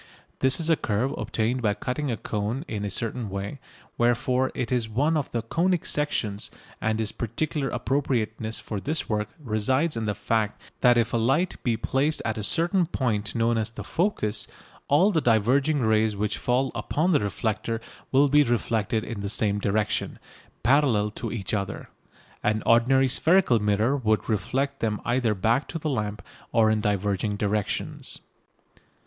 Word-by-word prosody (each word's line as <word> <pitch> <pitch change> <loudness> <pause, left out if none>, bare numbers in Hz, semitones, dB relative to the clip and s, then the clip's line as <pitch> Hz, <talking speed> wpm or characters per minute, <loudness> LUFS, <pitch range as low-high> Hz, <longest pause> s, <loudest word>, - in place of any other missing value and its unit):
This 130 +3 +3
is 165 - 0
a - - +6
curve 115 +1 -1
obtained 115 +3 -1
by 105 -3 +1
cutting 135 +5 -3
a 115 - -1
cone 110 +8 -3
in 105 -5 -4
a 105 - -2
certain 115 +2 -3
way, 100 +8 -5 0.4
wherefore 125 +2 +2
it 125 -2 -3
is 120 -3 0
one 145 +9 +1
of 150 -3 -1
the 115 -2 -2
"conic 170 +8 0
sections," 110 -8 -1 0.3
and 110 0 0
its 110 -1 0
particular 135 +5 -2
appropriateness 115 -4 -1
for 105 - -5
this 150 +9 -2
work 105 -1 -1
resides 130 +5 0
in 115 -1 -2
the 105 -1 -1
fact 110 -2 -1 0.2
that 120 -1 +5
if 115 -1 +1
a - - +3
light 135 +11 +1
be 115 -2 0
placed 140 +6 0
at 110 -1 -1
a - - -3
certain 170 - +2
point 110 - -1
known 115 0 +2
as 110 - -1
the 115 - -8
"focus" 160 - 0 0.4
all 180 +9 +4
the 165 -5 +1
diverging 130 +6 +3
rays 110 -1 +2
which 105 +1 -2
fall 125 +2 +1
upon 150 - 0
the 150 - +4
reflector 110 +2 -2 0.3
will 140 +2 +5
be 145 +2 +5
reflected 115 -4 0
in 115 -3 -5
the 100 0 -3
same 105 -1 +1
direction, 105 +1 0 0.5
parallel 120 -5 +3
to - - -5
each 105 -4 -4
other. 100 -2 -3 0.5
An 105 +1 0
ordinary 130 +3 +4
spherical 155 -1 +3
mirror 105 +5 +2
would 110 -6 0
reflect 130 +7 -1
them 110 -2 -1
either 120 -2 +1
back 115 +8 +1
to - - -4
the 155 -1 -2
lamp 105 -5 -3 0.3
or 110 -1 +4
in 110 -1 +1
diverging 105 0 0
directions. 105 0 -2
115 Hz, 170 wpm, -26 LUFS, 105-135 Hz, 0.5 s, a